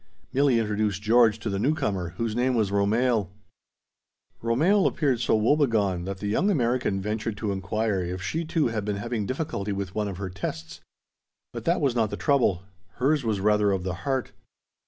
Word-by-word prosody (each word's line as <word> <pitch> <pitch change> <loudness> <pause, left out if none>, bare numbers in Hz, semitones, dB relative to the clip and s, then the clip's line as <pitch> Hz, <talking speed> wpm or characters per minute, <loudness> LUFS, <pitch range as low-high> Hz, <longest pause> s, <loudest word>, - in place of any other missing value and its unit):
Milli 135 -2 +3
introduced 105 -2 -1
George 115 0 +4
to 115 - -6
the 100 -2 -1
newcomer, 100 - -1
whose 115 -2 -2
name 125 +1 +1
was 105 -4 +1
Romehl. 105 0 +1 1.1
Romehl 160 - +3
appeared 135 -6 0
so 120 - +2
woebegone 110 - +2
that 95 0 -4
the 105 - -7
young 140 - +1
American 125 - +1
ventured 105 +1 -3
to 105 -1 -2
inquire 100 +1 -1
if 90 +1 -4
she 160 - -2
too 160 -5 0
had 110 -2 -2
been 105 -1 -2
having 110 -1 -3
difficulty 130 -7 -3
with 100 -1 -4
one 105 -1 -1
of 95 -3 -5
her 95 -1 -5
tests. 80 -4 -6 0.7
But - - -7
that 170 0 +2
was 140 -4 +2
not 110 -3 +2
the - - -5
trouble; 125 - +2 0.3
hers 140 +5 +1
was 110 -4 0
rather 105 0 +3
of 95 -2 -1
the 95 -1 -2
heart. 135 -2 -1
110 Hz, 180 wpm, -26 LUFS, 100-130 Hz, 1.1 s, George